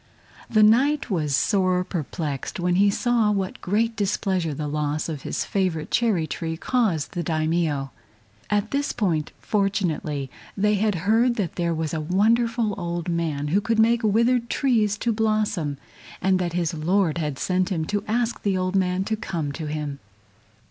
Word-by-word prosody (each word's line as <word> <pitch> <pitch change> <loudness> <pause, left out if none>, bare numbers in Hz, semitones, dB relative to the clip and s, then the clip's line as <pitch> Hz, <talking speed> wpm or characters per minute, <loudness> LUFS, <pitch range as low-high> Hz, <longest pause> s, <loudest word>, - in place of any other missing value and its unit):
The 215 -1 +4
Knight 260 +5 +3
was 150 -6 +1
sore 185 0 +2
perplexed 155 -4 -4
when 175 0 +1
he 200 +1 +5
saw 230 +1 +2
what 195 -2 -2
great 225 +4 0
displeasure 190 -4 0
the 150 +1 -3
loss 150 +1 -1
of 155 -4 -5
his - - -3
favorite 180 -6 -1
cherry 215 -9 +2
tree 160 +2 -4
caused 200 - 0
the 175 - -3
Daimio. 155 -3 0 0.6
At 210 +1 0
this 285 +1 0
point, 170 -9 0
fortunately, 175 - -1 0.3
they 210 +1 +3
had 210 0 +1
heard 235 +3 +3
that 200 -7 -2
there 170 -2 -1
was 160 -1 -2
a 160 - -1
wonderful 225 +6 +2
old 170 0 -3
man 155 -4 -1
who 195 +6 +2
could 225 +2 0
make 230 +2 +4
withered 235 +2 +2
trees 220 -7 +1
to 235 +1 0
blossom, 210 -9 0 0.4
and 190 0 +2
that 175 -2 -2
his 170 -2 0
Lord 170 +1 +1
had 150 -4 -2
sent 185 +3 0
him 160 -4 -1
to 205 +4 -2
ask 235 +2 0
the 195 -2 0
old 185 +1 -1
man 185 0 +1
to 220 +3 -1
come 165 -8 -3
to 155 +2 -5
him. 150 -2 -4
185 Hz, 170 wpm, -24 LUFS, 160-215 Hz, 0.6 s, he